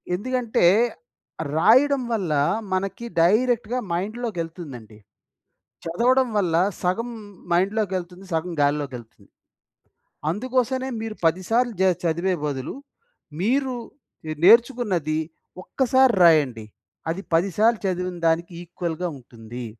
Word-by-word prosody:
ఎందుకంటే, 240 -1 0 0.9
రాయడం 260 - +4
వల్ల 190 -8 -1 0.4
మనకి 195 +4 -2 0.2
డైరెక్ట్‌గా 235 +6 +2
మైండ్లోకెళ్తుందండి. 170 - -5 0.9
చదవడం 250 +10 +2
వల్ల 180 -5 0 0.3
సగం 205 +7 -1 0.4
మైండ్లోకెళ్తుంది. 185 -1 -1
సగం 165 +2 -1
గాల్లోకెళ్తుంది. 140 -5 -2 1.0
అందుకోసనే 255 +6 -1
మీరు 220 -1 -5
పది 165 +3 +2
సార్లు 240 0 +2
జ - - +4 0.2
చదివే 170 +3 0
బదులు. 135 -3 -3 0.7
మీరు 260 +5 +1 0.7
నేర్చుకున్నది 210 - +4 0.4
ఒక్కసారి 260 -1 +3
రాయండి. 140 -10 +4 0.4
అది 170 +4 -2
పది 180 +4 +2
సార్లు 225 +1 +3
చదివిన 180 -1 -2
దానికి 170 +2 0
ఈక్వల్‌గా 175 0 -4
ఉంటుంది... 120 0 -10
185 Hz, 90 wpm, -23 LUFS, 165-235 Hz, 1.0 s, రాయడం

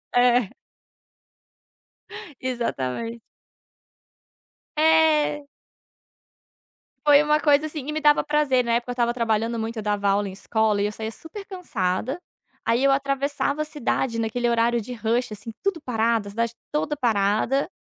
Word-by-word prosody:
É. 245 -3 +4 1.9
Exatamente. 230 - -3 1.6
É. 310 -2 +3 1.6
Foi 290 0 +7
uma 300 0 +3
coisa, 295 0 +3
assim 300 -3 -6
e 300 - -3
me 310 - -2
dava 295 -1 +4
prazer. 295 -4 +2
Na 235 - 0
época, 240 +1 0
eu - - -1
estava 240 -1 +1
trabalhando 230 -1 0
muito 225 +1 -4
eu 220 - -3
dava 205 -1 0
aula 200 +1 +2
em 190 - -6
escola 215 +1 0
e 205 - +2
eu 210 - -3
saía 220 +1 -5
super 360 - -10
cansada, 265 - -2 0.5
aí, 230 +3 +2
eu 275 - +4
atravessava 275 +2 0
a - - +1
cidade 265 -5 -2
naquele 235 +2 -1
horário 235 0 +2
de 245 +3 -7
rush, 230 +2 -1
assim, 210 +3 -8
tudo 375 -6 -1
parado, 225 -3 0
a - - -7
cidade 230 +2 -2 0.2
toda 300 0 -1
parada 225 +3 +1
240 Hz, 145 wpm, -24 LUFS, 225-295 Hz, 1.9 s, Foi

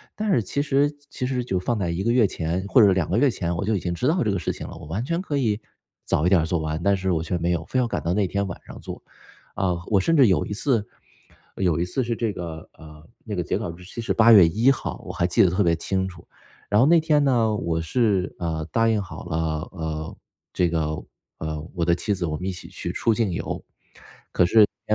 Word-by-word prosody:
但 215 -1 -1
是 120 - +3
其 140 +8 -2
实 145 0 +2 0.2
其 125 - -4
实 125 -1 -1
就 95 -6 -1
放 115 +5 -1
在 90 -4 -1
1 85 +3 -2
个 115 +3 +1
月 120 -4 +5
前 90 0 -2
或 120 - +6
者 100 -3 +6
2 90 -4 0
个 95 - +1
月 140 +2 +4
前， 85 -6 -2
我 100 - -2
就 110 -1 +1
已 - - 0
经 90 -1 -2
知 125 +9 -1
道 160 -2 +2
这 105 - +1
个 95 - -1
事 80 - -2
情 - - -8
了， - - -9
我 85 - -10
完 95 +9 -3
全 170 +6 -1
可 150 -6 -3
以 110 -5 +1 0.5
早 80 - +1
一 - - +4
点 95 -4 +5
儿 - - -1
做 85 0 0
完。 80 +1 -3
但 100 +2 +3
是 95 -1 -1
我 80 -2 +1
却 90 +2 -2
没 85 +1 0
有， 80 -2 -1
非 - - -3
要 125 - +3
赶 - - -3
到 85 +2 -1
那 100 -1 +2
天 100 +2 -1
晚 85 - -6
上 - - -10
做。 - - -8 0.5
啊， 95 -2 +1
我 100 - +3
甚 165 - +2
至 135 -5 +6
有 90 -7 +2
一 105 - -5
次 115 -2 0 0.7
有 90 -4 +1
一 85 - +2
次 120 +8 -2
是 115 - -1
这 115 -2 -1
个， 80 -4 -7
呃， 75 -1 -13 0.2
那 105 -2 -5
个 90 - -1
截 - - -1
稿 85 - -4
日 90 +2 -13
期 95 +6 -8
是 115 - -1
八 115 +1 +6
月 100 -7 +9
一 110 +11 +3
号， 135 - -3
我 - - -6
还 85 - 0
记 90 - +3
得 90 - +4
特 100 +3 +1
别 85 -1 +3
清 95 +3 -1
楚。 85 -2 -10 0.4
然 105 +1 +3
后 130 - +5
那 165 +1 +6
天 150 -2 +2
呢， 115 -5 +2
我 80 -4 -1
是， 95 +2 0
呃， 80 -2 -2
答 115 0 +2
应 110 -2 +1
好 95 - -9
了， 85 -2 -3 0.4
呃， 80 -2 -5 0.4
这 90 -1 +2
个， 80 -2 -1 0.4
呃， 80 +1 -5
我 85 -3 0
的 85 - +3
妻 105 +3 -1
子 95 -2 -4
我 75 -2 -2
们 90 - -5
一 95 - -1
起 90 - -10
去 - - -5
出 115 - +1
境 105 -4 0
游。 - - -4 1.3
可 110 - +2
95 Hz, 280 characters per minute, -24 LUFS, 85-115 Hz, 1.3 s, 月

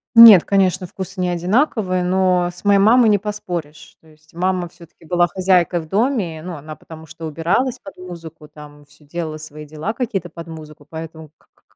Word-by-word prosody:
Нет, 225 -6 +10
конечно, 190 -2 +1
вкусы 190 +2 -7
не 180 - 0
одинаковые, 185 - 0
но 180 -1 +2
с 180 - -15
моей 200 -1 +5
мамой 225 +4 +5
не 210 - +5
поспоришь. 175 -7 -6
То 160 - -22
есть 155 0 -24
мама 180 0 -1
всё-таки 170 -1 -18
была 175 +1 +2
хозяйкой 180 -1 +1
в 160 - -11
доме, 200 - -1
ну, 180 -1 -6
она 155 +1 -9
потому 160 0 -13
что 160 +1 -9
убиралась 170 - -1
под 195 - -12
музыку, 170 -4 -10
там 150 -1 -14
всё 150 +1 -23
делала 155 0 -5
свои 150 0 -9
дела 155 +8 -5
какие-то 215 -9 -3
под 170 0 -10
музыку, 155 -2 -11
поэтому 160 0 -9
к - - -31
к - - -35
175 Hz, 190 wpm, -19 LUFS, 160-190 Hz, -, Нет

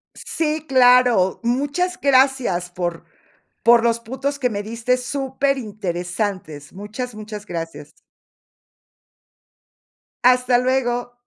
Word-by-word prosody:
Sí, 310 -1 -3
claro. 250 -7 +4
Muchas 290 +9 -1
gracias 260 -10 +2
por 175 -1 -4 0.6
por 235 0 +6
los 235 0 +2
puntos, 265 +5 -4
que 255 -2 +1
me 205 -2 -4
diste 230 +3 -1
superinteresantes. 210 - -3
Muchas, 215 +5 -7
muchas 210 -1 -8
gracias. 165 -1 -7 2.3
Hasta 250 0 +4
luego. 245 -1 0
245 Hz, 90 wpm, -21 LUFS, 205-260 Hz, 2.3 s, por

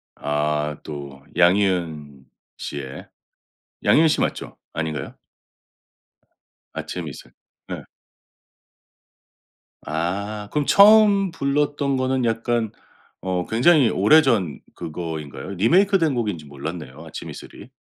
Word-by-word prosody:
아. 75 0 -1
또 70 -2 -8
양희은 85 -7 +1 0.3
씨의. 70 -2 -7 0.8
양희은 160 +1 +5
씨 - - +1
맞죠? - - -3 0.2
아닌가요? 80 -2 -4 1.6
아침이슬. - - -7 0.4
예. - - -6 2.0
아 100 +6 -3
그럼 150 -2 0
처음 200 -2 +6
불렀던 140 -1 0
거는 130 -1 0
약간 115 -1 0 0.5
어 90 -1 -2
굉장히 130 +3 +4
오래전 105 - +3 0.2
그거인가요? 80 -3 -6
리메이크된 170 - +3
곡인지 105 -10 -2
몰랐네요 70 0 -7
아침 - - -8
이슬이. - - -11
100 Hz, 210 characters per minute, -22 LUFS, -, 2.0 s, 처음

